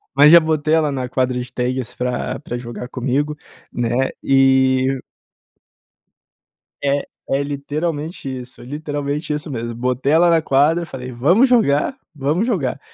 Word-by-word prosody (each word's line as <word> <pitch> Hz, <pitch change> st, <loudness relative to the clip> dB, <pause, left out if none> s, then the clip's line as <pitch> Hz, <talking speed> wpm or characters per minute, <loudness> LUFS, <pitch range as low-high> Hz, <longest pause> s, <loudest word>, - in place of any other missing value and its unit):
mas 145 Hz, +2 st, +7 dB
já 170 Hz, -, +10 dB
botei 155 Hz, -1 st, 0 dB
ela 155 Hz, -2 st, +3 dB
na 130 Hz, -2 st, -3 dB
quadra 130 Hz, -1 st, 0 dB
de 125 Hz, 0 st, -6 dB
tênis 125 Hz, -1 st, -2 dB
pra 125 Hz, +1 st, -2 dB
pra 120 Hz, -4 st, -5 dB
jogar 120 Hz, 0 st, -7 dB
comigo, 135 Hz, +4 st, -1 dB, 0.4 s
né, 120 Hz, +2 st, 0 dB
e 130 Hz, 0 st, +3 dB, 1.8 s
É 140 Hz, 0 st, +1 dB, 0.3 s
é 135 Hz, -, +1 dB
literalmente 145 Hz, +3 st, -4 dB
isso, 125 Hz, +1 st, -14 dB
literalmente 145 Hz, +2 st, -4 dB
isso 150 Hz, +1 st, -5 dB
mesmo. 115 Hz, -2 st, -4 dB
Botei 125 Hz, +4 st, -1 dB
ela 170 Hz, +2 st, +5 dB
na 165 Hz, -1 st, +4 dB
quadra 155 Hz, +4 st, +2 dB
e -, -, -6 dB
falei: 130 Hz, -5 st, -7 dB
"Vamos 175 Hz, -, +4 dB
jogar, 230 Hz, -, +2 dB, 0.2 s
vamos 150 Hz, +8 st, 0 dB
jogar" 170 Hz, -, -1 dB
140 Hz, 145 wpm, -19 LUFS, 125-155 Hz, 1.8 s, já